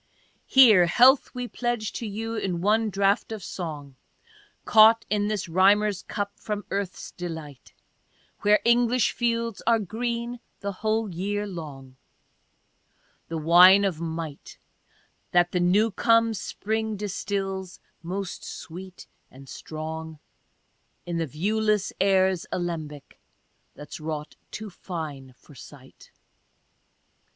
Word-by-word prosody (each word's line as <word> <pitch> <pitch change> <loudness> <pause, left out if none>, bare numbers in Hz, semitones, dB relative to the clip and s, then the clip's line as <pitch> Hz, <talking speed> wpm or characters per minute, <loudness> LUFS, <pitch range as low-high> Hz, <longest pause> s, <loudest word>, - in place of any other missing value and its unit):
Here 220 -10 +7
health 255 - +5
we 250 0 -4
pledge 240 -3 -3
you 225 +1 -4
in 190 -6 -2
one 215 +4 +2
draught 200 +2 +1
of 215 -4 -6
song, 150 -8 -7 0.7
Caught 220 +1 +6
in 205 -1 +1
this 210 -3 -2
rhyms'er's 195 +3 +3
cup 205 -1 -4
from 210 -1 -4
earth's 195 -2 -4
delight, 160 -6 -8 0.7
Where 210 +1 +4
English 240 0 +3
fields 230 -2 -2
are 230 -1 +5
green 235 +3 -4 0.2
the 200 0 -3
whole 215 +3 -1
year 205 +4 -2
long, 140 -8 -9 0.6
— - - -41
The 165 - -3
wine 180 +5 +7
of 170 -5 -2
might, 160 -3 -6 0.8
That 175 0 +4
the 180 - 0
new 200 +6 +3
come 230 +3 +3
spring 220 +1 -3
distils, 195 -2 -4 0.2
most 185 +2 -5
sweet 185 +2 -9 0.2
and 135 +1 -15
strong, 160 +2 -7 0.9
In 170 -1 -3
the 165 - -1
viewless 210 - 0
air' 190 -1 +3
's 170 - -10
alembic, 160 -5 -5 0.6
thafs 150 - -9
wrought 155 -1 -5
too 215 -2 -7
fine 150 -8 -7
for 150 - -18
sight. 130 - -15
195 Hz, 120 wpm, -25 LUFS, 165-220 Hz, 0.9 s, Here